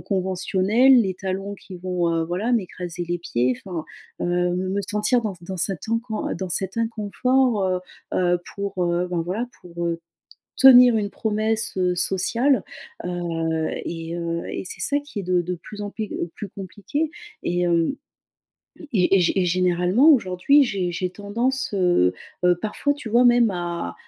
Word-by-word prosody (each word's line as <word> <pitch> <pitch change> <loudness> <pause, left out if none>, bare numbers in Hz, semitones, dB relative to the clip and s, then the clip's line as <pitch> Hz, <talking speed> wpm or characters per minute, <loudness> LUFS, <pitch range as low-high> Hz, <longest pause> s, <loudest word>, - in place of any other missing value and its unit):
conventionnelle, 195 +6 +3
les 190 -4 -1
talons 195 +2 -4
qui 190 -1 -11
vont, 180 -1 -1
heu, 165 0 0
voilà, 180 +8 -2
m'écraser 180 -5 -2
les 175 0 -1
pieds, 125 -6 0
enfin, 175 -5 -5 0.4
heu, - - -1 0.3
me 190 +2 -1
sentir 210 +3 +2
dans 210 -3 -3
c 175 -1 -17
dans 190 0 -5
cet 185 +1 -2
incon 230 -1 -2
dans 190 - -4
cet 190 +3 -2
inconfort, 230 +1 +1
heu, 185 -1 +1 0.4
heu, 175 -1 +2 0.2
pour, 200 -2 -2
heu, 175 +1 0
bah, 175 -2 -1
voilà, 210 +8 -2
pour 170 -1 -5
heu, 170 0 -2 0.6
tenir 250 -3 +8
une 205 -1 -1
promesse, 220 +2 -1
heu, 180 -1 +1
sociale. 230 +9 +1 0.4
Heu 165 -2 -2 0.2
et 165 0 -5
heu 170 0 -3
et - - -4
c'est - - -8
ça 285 - +1
qui 290 -7 -7
est - - -9
de 180 0 +2
de 180 +1 -3
plus 210 +4 -10
en 205 - -4
plus 215 +1 -5 0.3
plus 205 - -7
compliqué. 205 - -4 0.3
Et, 175 +1 0
hem 170 +7 +2 1.0
et 185 -6 +3
gé 195 - +5
et - - +4
gé 175 - +3
et - - +2
généralement, 180 - +3
aujourd'hui, 255 - +4
j'ai 195 -7 -1
j'ai 180 +1 -2
tendance, 235 +7 -2
heu, 175 - +3 0.3
heu 180 -1 +5
parfois, 220 +8 0
tu 285 -5 -8
vois, 240 +3 +4
même 240 -2 +5
à 170 - -4
190 Hz, 170 wpm, -23 LUFS, 175-220 Hz, 1.0 s, tenir